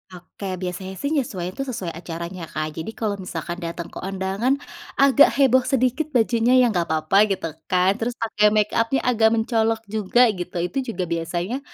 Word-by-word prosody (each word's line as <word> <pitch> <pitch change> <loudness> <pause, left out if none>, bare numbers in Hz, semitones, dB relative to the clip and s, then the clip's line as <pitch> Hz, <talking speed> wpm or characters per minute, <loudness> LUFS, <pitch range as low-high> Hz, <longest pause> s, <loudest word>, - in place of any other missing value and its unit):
Oke, 185 +2 -7
biasanya 185 +1 -5
sih 280 +9 -3
menyesuaikan 200 - -2
itu 275 - -4
sesuai 195 -9 -4
acaranya, 170 0 -6
Kak. 155 0 -4
Jadi 160 +7 -5
kalau 205 -3 -2
misalkan 180 -1 -5
datang 170 -1 -6
ke - - -8
undangan 195 +7 -1 0.4
agak 275 +1 +6
heboh 265 -2 +5
sedikit 260 +3 +1
bajunya 235 +1 +3
ya, 240 - +3
nggak 175 -4 0
apa-apa 160 +7 +3
gitu 190 -5 -2 0.2
kan, 185 +1 +3
terus 235 +1 -2
pakai 220 -2 +2
makeup-nya 230 +4 +1
agak 230 -3 +4
mencolok 225 0 0
juga, 220 +3 +2
gitu, 180 -3 -7
itu 180 +10 -4 0.2
juga 185 - -1
biasanya, 175 +7 -2
200 Hz, 170 wpm, -23 LUFS, 180-235 Hz, 0.4 s, agak